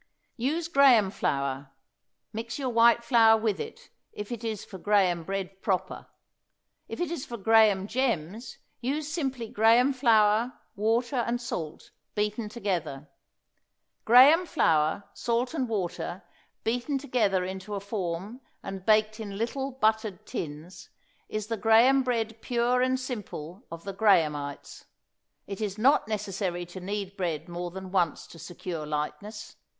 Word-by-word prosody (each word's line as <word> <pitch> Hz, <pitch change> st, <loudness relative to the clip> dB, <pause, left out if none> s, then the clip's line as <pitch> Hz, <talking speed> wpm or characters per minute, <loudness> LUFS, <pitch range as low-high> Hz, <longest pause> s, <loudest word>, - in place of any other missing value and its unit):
Use 305 Hz, +7 st, -1 dB
graham 265 Hz, -, +5 dB
flour; 140 Hz, -4 st, -2 dB, 0.6 s
mix 225 Hz, +1 st, -5 dB
your 270 Hz, -3 st, -2 dB
white 235 Hz, 0 st, +5 dB
flour 225 Hz, -3 st, +5 dB
with 215 Hz, -2 st, -1 dB
it, 450 Hz, +1 st, -8 dB, 0.2 s
if 210 Hz, +2 st, -7 dB
it 235 Hz, -1 st, -5 dB
is 220 Hz, -3 st, -4 dB
for 190 Hz, -, -10 dB
graham 190 Hz, -4 st, +2 dB
bread 195 Hz, +1 st, -5 dB
proper; 190 Hz, -3 st, -2 dB, 0.8 s
if -, -, -7 dB
it 350 Hz, -2 st, -1 dB
is 335 Hz, -6 st, -4 dB
for 235 Hz, -, -7 dB
graham 215 Hz, -2 st, +4 dB
gems 230 Hz, -2 st, -2 dB, 0.2 s
use 285 Hz, +5 st, -2 dB
simply 270 Hz, -7 st, -3 dB
graham 230 Hz, +6 st, +4 dB
flour, 230 Hz, -1 st, +3 dB, 0.2 s
water 230 Hz, +5 st, 0 dB
and 240 Hz, 0 st, 0 dB
salt, 235 Hz, -, -6 dB, 0.2 s
beaten 210 Hz, +1 st, -1 dB
together. 175 Hz, -, -3 dB, 0.9 s
Graham 280 Hz, +10 st, +7 dB
flour, 160 Hz, -, +2 dB
salt 240 Hz, +3 st, -1 dB
and 265 Hz, -7 st, -2 dB
water 185 Hz, -2 st, -3 dB, 0.4 s
beaten 245 Hz, +5 st, -1 dB
together 220 Hz, -9 st, +1 dB
into 190 Hz, +2 st, -5 dB
a -, -, -2 dB
form 200 Hz, +3 st, -4 dB, 0.2 s
and 195 Hz, -1 st, -6 dB
baked 215 Hz, +1 st, +3 dB
in 200 Hz, -3 st, -6 dB
little 265 Hz, +5 st, -2 dB
buttered 220 Hz, -6 st, 0 dB
tins 155 Hz, +3 st, -7 dB, 0.4 s
is 215 Hz, -1 st, -3 dB
the 225 Hz, +1 st, -3 dB
graham 230 Hz, +6 st, +5 dB
bread 225 Hz, -3 st, -2 dB
pure 245 Hz, +1 st, +1 dB
and 255 Hz, 0 st, +1 dB
simple 205 Hz, -, -7 dB
of 165 Hz, 0 st, -8 dB
the 195 Hz, -, -5 dB
Grahamites. 155 Hz, -9 st, +1 dB, 0.6 s
It 200 Hz, +1 st, -7 dB
is 205 Hz, -1 st, -3 dB
not 255 Hz, +1 st, +3 dB
necessary 195 Hz, -4 st, -3 dB
to 175 Hz, +2 st, -9 dB
knead 200 Hz, +1 st, -4 dB
bread 170 Hz, -6 st, -3 dB
more 175 Hz, 0 st, -5 dB
than 190 Hz, +1 st, -8 dB
once 175 Hz, -5 st, 0 dB
to 165 Hz, -, -14 dB
secure 165 Hz, -1 st, -6 dB
lightness. 200 Hz, +9 st, -5 dB
215 Hz, 140 wpm, -28 LUFS, 185-240 Hz, 0.9 s, Graham